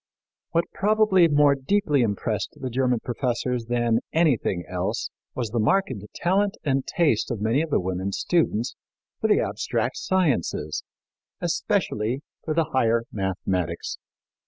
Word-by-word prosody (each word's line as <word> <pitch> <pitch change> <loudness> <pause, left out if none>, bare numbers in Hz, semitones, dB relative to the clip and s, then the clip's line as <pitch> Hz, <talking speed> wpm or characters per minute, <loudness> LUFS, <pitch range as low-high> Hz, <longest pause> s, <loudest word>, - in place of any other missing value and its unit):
What 170 +1 +1
probably 210 -3 +4
more 145 -2 +5
deeply 145 +1 +1
impressed 105 -4 -1
the 130 -2 -4
German 125 -1 +1
professors 125 -1 -2
than 120 -1 +1
anything 135 - +2
else - - -2 0.2
was 120 -4 -2
the 120 - 0
marked 190 - +2 0.2
talent 195 +3 +1
and 135 -3 0
taste 150 -11 +2
of 115 - -2
many 110 +7 +2
of 165 - -3
the - - +2
women 95 +1 -2
students 125 - 0 0.4
for - - +1
the - - +4
abstract - - -1
sciences, 140 - 0 0.6
especially 115 +7 -1 0.2
for 155 - -2
the 160 -1 +1
higher 115 -3 +3
mathematics. 95 -3 -2
130 Hz, 135 wpm, -25 LUFS, 110-160 Hz, 0.6 s, more